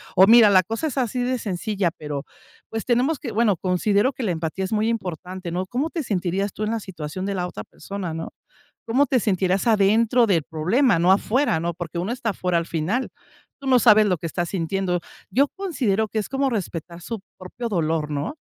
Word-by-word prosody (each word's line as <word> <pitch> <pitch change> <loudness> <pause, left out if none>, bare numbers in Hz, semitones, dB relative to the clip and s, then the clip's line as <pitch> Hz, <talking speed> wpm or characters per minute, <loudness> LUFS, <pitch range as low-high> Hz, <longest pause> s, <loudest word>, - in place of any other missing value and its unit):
o: 190 - +7
"Mira, 225 -1 +8
la 185 -2 +5
cosa 225 - -3
es 280 - -5
así 250 -1 0
de 255 0 -1
sencilla", 195 -2 -1
pero, 145 -2 -5 0.5
pues, 225 0 -4
tenemos 255 +5 +1
que 240 - -5
bueno, 215 -3 +2
considero 200 - +1
que 255 - -5
la 195 - 0
empatía 165 +3 -3
es 190 - -6
muy 215 +1 +1
importante, 185 -4 -4
¿no?, 180 +2 -2
¿cómo 270 +9 -1
te 325 -1 -3
sentirías 195 -2 -1
tú 215 - -4
en 215 - -1
la 230 - -1
situación 175 0 -6
de 200 0 -2
la 180 -1 -1
otra 105 -12 -7
persona?, 195 -4 -6
¿no?, 165 0 -5 0.6
¿cómo 265 +5 +3
te 260 -3 +2
sentirías 190 -1 +1
adentro 225 +3 +4
del 175 -7 +2
problema?, 180 - +2
no 175 +3 +5
afuera, 215 - +2
¿no?, 170 0 -2
porque 175 -1 -6
uno 180 +5 -2
está 235 -3 -2
afuera 180 -2 0
al 165 - -2
final, 175 +12 -1 0.5
tú 275 - -9
no 255 - +6
sabes 215 -2 +6
lo 180 -4 +1
que 165 - -5
estás 175 +1 -2
sintiendo, 185 0 -1 0.3
yo 275 +3 +3
considero 255 - -1
que 220 - -3
es 210 - -5
como 270 0 0
respetar 175 -5 -4
su 225 +3 -5 0.2
propio 230 +6 -6
dolor, 160 -5 -1
¿no?, 145 - -3
200 Hz, 210 wpm, -23 LUFS, 175-230 Hz, 0.6 s, Mira